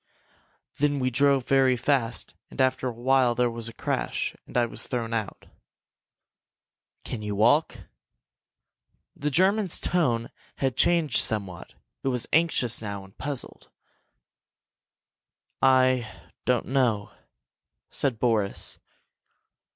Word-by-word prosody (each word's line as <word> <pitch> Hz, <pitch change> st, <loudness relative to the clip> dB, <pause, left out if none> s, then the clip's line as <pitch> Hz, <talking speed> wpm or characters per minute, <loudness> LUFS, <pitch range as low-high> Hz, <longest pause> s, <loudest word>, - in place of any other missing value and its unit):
Then 145 Hz, 0 st, +2 dB
we 130 Hz, -1 st, 0 dB
drove 140 Hz, 0 st, +3 dB
very 130 Hz, -2 st, +3 dB
fast 125 Hz, -2 st, 0 dB, 0.2 s
and -, -, -13 dB
after 130 Hz, 0 st, +2 dB
a -, -, -1 dB
while 125 Hz, +1 st, +2 dB
there 125 Hz, -1 st, +1 dB
was 115 Hz, 0 st, -5 dB
a -, -, -11 dB
crash, -, -, -2 dB
and -, -, -4 dB
I 120 Hz, -, +4 dB
was 115 Hz, -, -5 dB
thrown 115 Hz, -2 st, -3 dB
out." 110 Hz, -4 st, -4 dB, 1.6 s
"Can 115 Hz, -, -5 dB
you 105 Hz, -1 st, -3 dB
walk?" 120 Hz, +10 st, +3 dB, 1.3 s
The 150 Hz, -, -2 dB
German's 190 Hz, +4 st, +2 dB
tone 120 Hz, -10 st, 0 dB, 0.2 s
had 135 Hz, -3 st, -1 dB
changed 165 Hz, -7 st, +3 dB
somewhat. 100 Hz, -5 st, -3 dB, 0.3 s
It -, -, -4 dB
was 125 Hz, -3 st, 0 dB
anxious 150 Hz, -8 st, +2 dB
now, 100 Hz, -2 st, -5 dB
and 95 Hz, +1 st, -17 dB
puzzled. 145 Hz, -2 st, -6 dB, 1.9 s
"I 130 Hz, -4 st, +3 dB, 0.4 s
don't 125 Hz, -2 st, +2 dB
know," 120 Hz, -7 st, +1 dB, 0.8 s
said 135 Hz, -5 st, 0 dB
Boris. 110 Hz, -4 st, 0 dB
125 Hz, 115 wpm, -26 LUFS, 115-135 Hz, 1.9 s, I